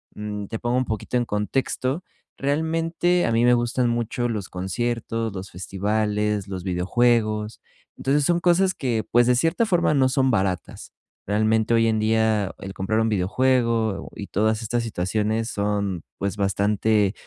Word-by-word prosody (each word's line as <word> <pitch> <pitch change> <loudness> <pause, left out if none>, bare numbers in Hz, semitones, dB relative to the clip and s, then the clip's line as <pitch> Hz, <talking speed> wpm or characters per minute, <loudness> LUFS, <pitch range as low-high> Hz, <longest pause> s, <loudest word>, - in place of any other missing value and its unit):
mm, 105 -1 -5
te 110 - -4
pongo 120 +1 0
un 130 - +1
poquito 110 +2 -2
en 120 - 0
contexto. 130 - -1 0.3
Realmente 165 +4 +1
a - - 0
mí 115 +1 +3
me 125 0 +5
gustan 120 +1 +1
mucho 120 +1 -1
los 105 -4 -3
conciertos, 115 +3 -2
los 95 0 -7
festivales, 105 +2 -1
los 95 -2 -5
videojuegos. 105 +3 +1 0.4
Entonces 140 +2 +1
son 170 +4 +2
cosas 180 +2 +3
que, 120 -8 -1
pues, 120 0 +4
de 125 - +4
cierta 165 - +2
forma 175 -6 +2
no 135 -3 +4
son 130 0 +2
baratas. 95 -4 -2 0.3
Realmente 110 +2 +1
hoy 115 0 +4
en 110 -1 +1
día, 110 -2 +1
el 95 - -7
comprar 100 +4 -1
un 115 - +2
videojuego 115 +2 +1
y - - -6
todas 110 +2 0
estas 120 +1 -1
situaciones 110 +2 -1
son, 100 -4 -1 0.2
pues, 100 0 -2
bastante 100 +1 +1
110 Hz, 155 wpm, -23 LUFS, 105-125 Hz, 0.4 s, me